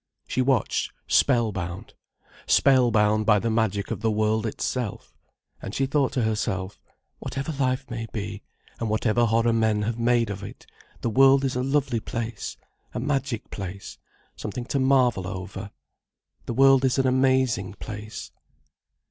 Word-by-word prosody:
She 130 - 0
watched 130 -3 +1
spell 120 -5 +3
bound: 90 -2 -6 0.5
spell 130 -3 +5
bound 110 -1 +2
by 105 -2 +6
the 115 +3 -1
magic 105 -3 0
of - - -3
the 110 - +1
world 110 +1 +1
itself. 115 0 -4 0.5
And 100 - -6
she 135 - +1
thought 140 0 +1
to 125 - 0
herself: 100 -3 -2 0.4
"Whatever 135 +3 -4
life 130 0 -1
may 115 -1 -5
be, 105 -1 -5 0.4
and 115 - -2
whatever 110 +2 +2
horror 115 +1 +2
men 110 -2 +2
have 115 +2 -2
made 115 -2 +2
of 100 0 -6
it, 100 - -10 0.4
the 115 - -1
world 135 +3 +5
is 130 - -1
a 125 - 0
lovely 135 -2 0
place, 115 +1 -5 0.4
a - - -1
magic 135 -3 -2
place, 95 0 -7 0.4
something 120 +4 -5
to 140 - +2
marvel 130 -8 +3
over. 95 +1 -6 0.8
The 120 - -3
world 135 0 +6
is 130 -1 +2
an 135 - +2
amazing 130 -6 +2
place." 105 +1 -8
115 Hz, 155 wpm, -25 LUFS, 105-130 Hz, 0.8 s, by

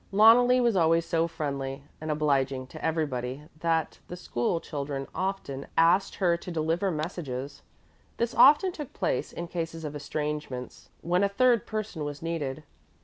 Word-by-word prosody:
Loneli 235 +5 +6
was 235 -3 +2
always 165 -1 +3
so 165 -1 +1
friendly 140 -3 -4 0.2
and 155 - -5
obliging 140 -3 +1
to - - -11
everybody 140 -4 -2 0.2
that 165 -1 0
the 180 - -6
school 165 -2 -1
children 140 -3 -4
often 185 -8 -3
asked 170 +4 +4
her 175 -3 +2
to 170 - -8
deliver 165 +3 0
messages. 150 -5 -4 0.6
This 235 0 -1
often 365 +6 +6
took 300 -6 -8
place - - -1
in 170 - -6
cases 165 -2 -4
of 150 0 -5
estrangements 150 -3 -5
when 180 +3 +1
a 200 - +3
third 235 +2 +3
person 215 -7 -4
was 145 +1 -5
needed. 155 -3 -3
165 Hz, 150 wpm, -28 LUFS, 145-185 Hz, 0.6 s, Loneli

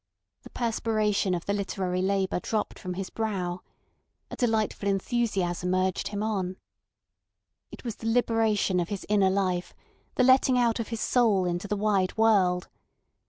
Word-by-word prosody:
The - - -13
perspiration 215 -5 0
of 170 - -5
the 200 - 0
literary 185 -2 -2
labour 190 -1 0
dropped 215 +3 -3
from 180 -1 -5
his 190 0 -5
brow. 185 -5 -3 0.7
A - - -5
delightful 220 -4 0
enthusiasm 190 -4 0
urged 185 0 0
him 205 0 -3
on. 190 -4 -2 1.1
It - - -11
was 235 -4 -5
the 225 - -5
liberation 225 -5 +2
of 175 - -2
his 200 -2 -5
inner 200 -2 +4
life, 185 -2 -1 0.4
the 255 - +3
letting 260 0 +5
out 240 -1 +2
of 230 - -3
his 230 -1 -4
soul 220 -7 +3
into 175 +2 -2
the 210 +1 -1
wide 200 -2 +1
world. 195 -5 +3
200 Hz, 155 wpm, -27 LUFS, 185-225 Hz, 1.1 s, letting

